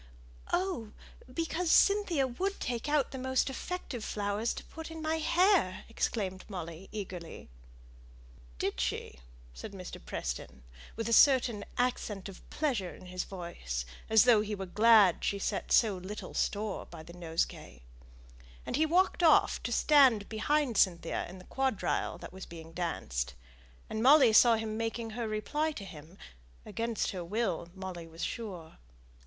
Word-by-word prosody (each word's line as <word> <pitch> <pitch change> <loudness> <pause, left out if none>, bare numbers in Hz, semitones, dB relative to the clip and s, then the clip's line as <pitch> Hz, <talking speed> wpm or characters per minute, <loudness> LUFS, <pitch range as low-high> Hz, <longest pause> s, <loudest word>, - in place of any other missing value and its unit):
"Oh, 350 - -1 0.4
because 330 +4 -1
Cynthia 390 -8 +4
would 375 +11 -3
take 245 +3 -3
out 295 -2 +2
the 265 - -6
most 260 +1 0
effective 270 -5 -5
flowers 205 +2 -1
to - - -7
put 320 0 -9
in 325 0 -8
my 315 0 0
hair!" 340 - +2
exclaimed 195 -4 -2
Molly, 175 -1 -7
eagerly. 185 - -7 1.1
"Did - - -2
she?" 65 +1 -3 0.3
said - - -8
Mr. 185 -2 -8
Preston, 60 +2 -5 0.3
with 225 0 -3
a 230 - +1
certain 245 -6 +5
accent 235 -6 -1
of 195 - -11
pleasure 245 - -1
in - - -14
his 180 0 -4
voice, 60 - -5 0.2
as 220 -1 +7
though 240 -4 +6
he 210 0 -3
were 195 -1 -5
glad 210 -1 +5
she 200 - 0
set 195 - -3
so 215 -5 +4
little 190 +4 -7
store 205 -1 -2
by 165 -2 -10
the 170 - -12
nosegay; 160 - -3 0.8
and - - -2
he 315 +1 +3
walked 365 +3 +2
off 330 -2 +5
to - - -4
stand 265 -9 +5
behind 250 +2 0
Cynthia 175 -3 +1
in 185 - -10
the 180 - -13
quadrille 265 -6 -1
that - - -10
was 190 0 -9
being 165 -1 -10
danced; 65 - -3 0.5
and 220 - -3
Molly 265 -2 +7
saw 230 +1 +7
him 220 -1 -3
making 225 0 -3
her 230 +1 -3
reply 295 +9 -1
to 200 - -7
him 165 0 -12 0.5
against 230 -2 -2
her 185 -2 -5
will, 185 -3 -2
Molly 185 -3 -7
was 165 +1 -8
sure. 185 -9 -6
215 Hz, 155 wpm, -31 LUFS, 180-260 Hz, 1.1 s, as